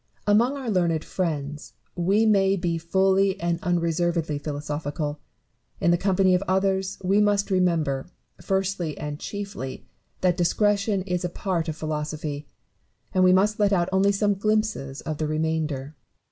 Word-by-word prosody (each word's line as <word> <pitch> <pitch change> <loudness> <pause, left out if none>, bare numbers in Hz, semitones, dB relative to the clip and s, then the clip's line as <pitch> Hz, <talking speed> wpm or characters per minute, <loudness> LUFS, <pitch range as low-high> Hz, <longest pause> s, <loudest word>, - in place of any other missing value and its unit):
Among 235 +7 +3
our 255 -5 -3
learned 170 -4 +1
friends, 150 -5 -3 0.2
we 195 +5 +2
may 195 -2 +4
be 170 -3 -1
fully 190 +3 +2
and 170 -1 -1
unreservedly 170 -3 0
philosophical; 145 0 -4 0.6
in 170 - +3
the - - +5
company 190 -1 +3
of 180 - +3
others 190 0 +1
we 195 +3 +3
must 205 -1 +2
remember, 165 -7 +1 0.3
first 195 -1 -1
and 150 -2 -4
chiefly, 200 -10 -6 0.4
that 180 -2 +2
discretion 200 +2 +1
is 180 -2 -2
a 180 - -1
part 175 -2 -2
of 155 - -3
philosophy, 150 -1 -4 0.7
and 185 - +3
we 185 - +6
must 205 +3 +3
let 205 -1 +3
out 175 -2 +2
only 190 +1 +3
some 205 +1 +2
glimpses 215 -9 -1
of 155 -2 -5
the 155 - 0
remainder. 155 -2 -2
180 Hz, 145 wpm, -25 LUFS, 155-195 Hz, 0.7 s, we